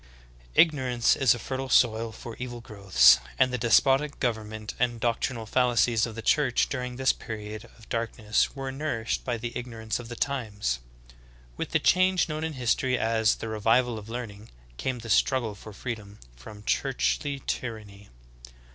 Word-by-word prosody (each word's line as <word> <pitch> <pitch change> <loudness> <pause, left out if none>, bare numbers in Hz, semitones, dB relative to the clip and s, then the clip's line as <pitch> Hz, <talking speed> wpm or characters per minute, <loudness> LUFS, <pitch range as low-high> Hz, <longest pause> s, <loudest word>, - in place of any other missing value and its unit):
2. - - +9
Ignorance 130 -7 +2
is 130 -4 +4
a - - -6
fertile 130 +2 -4
soil 115 -2 +3
for 115 +1 -9
evil 120 -1 -5
growths, 100 - +5 0.2
and 130 -1 +3
the - - +1
despotic 135 +5 +3
government 110 -3 -3
and 120 -1 0
doctrinal 115 0 -1
fallacies 120 -1 +2
of 110 - -8
the 115 - -6
Church 135 -1 +2
during 125 -2 -4
this 130 +1 +2
period 110 0 -7
of 110 - -17
darkness 115 -1 -1
were 135 -1 -4
nourished 130 -5 -2
by 120 -2 -2
the 120 +1 -6
ig 125 - -4
norance 110 -2 -4
of 120 - -8
the 120 - -6
times. 110 - -2 0.8
With - - -4
the - - +2
change 185 0 +3
known 155 -1 -4
in 160 -1 -2
history 125 0 +1
as 110 -1 +2
"the - - -6
revival 115 +2 +1
of 105 +1 -12
learning" 115 -3 -7 0.3
came 130 - -2
the 115 -1 -9
struggle 120 0 +2
for 105 +2 -11
freedom 105 -1 -7 0.2
from 105 - -12
churchly 65 - -1
tyranny. 105 -4 -5
115 Hz, 165 wpm, -27 LUFS, 110-130 Hz, 0.8 s, 2